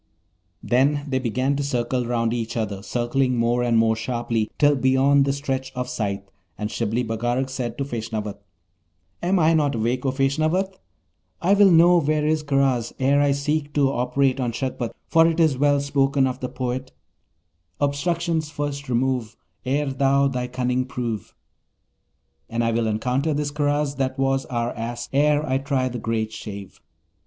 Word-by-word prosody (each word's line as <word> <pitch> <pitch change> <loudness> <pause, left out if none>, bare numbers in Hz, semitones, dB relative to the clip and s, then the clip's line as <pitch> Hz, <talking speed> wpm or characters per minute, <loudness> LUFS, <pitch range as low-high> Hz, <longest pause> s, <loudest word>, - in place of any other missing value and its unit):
Then 140 +4 +2
they 130 -2 0
began 130 +3 0
to 145 - -1
circle 125 -2 -1
each 120 - -4
round 115 -1 0
the 115 -1 -2
other, 105 -4 -2
circling 125 +4 0
more 120 +1 +1
and 120 -1 +2
more 115 0 +3
sharply 115 -1 -2
till 145 -1 +4
beyond 135 +1 +3
the 140 - +1
stretch 135 -2 -3
of 125 -1 -3
sight, 100 -5 -3 0.3
and 105 0 -4
Shibli 115 +2 -1
Bagarag 120 +3 -1
said 120 -3 -4
to 140 - -2
Feshnavat, 110 -5 -4 0.8
'Am 185 +3 +2
I 165 -1 +4
not 145 -3 +2
awake, 120 +3 -1
O 135 - +1
Feshnavat? 155 +8 0 0.7
I 185 +3 +3
will 200 -1 +6
know 175 0 +6
where 150 0 +1
is 155 0 +1
Karaz 135 -5 +1
ere 140 +2 +3
I 145 -1 +3
seek 145 +1 -1
to 140 -2 +3
operate 135 +1 +1
on 125 -2 0
Shagpat, 125 -2 -3
for 165 0 +5
it 165 0 0
is 155 -6 +3
well 145 0 +3
spoken 140 -1 +2
of 130 0 -2
the 125 - -4
poet: 130 0 -4 0.9
"Obstructions 160 +2 0
first 145 -2 -4
remove 125 -2 -1 0.3
Ere 140 +1 0
thou 140 +1 +3
thy 125 -2 -2
cunning 125 0 -1
prove"; 120 -5 -5 1.1
and 115 +1 -1
I 115 - +1
will 115 0 0
encounter 125 +8 0
this 145 0 -1
Karaz 145 -1 0
that 135 -1 -1
was 135 0 0
our 120 -1 -2
Ass, 120 +1 -5
ere 150 +2 +3
I 130 +1 +1
try 135 -2 0
the 125 -1 -5
great 110 -1 -2
shave.' 100 -3 -9
130 Hz, 170 wpm, -23 LUFS, 120-145 Hz, 1.1 s, will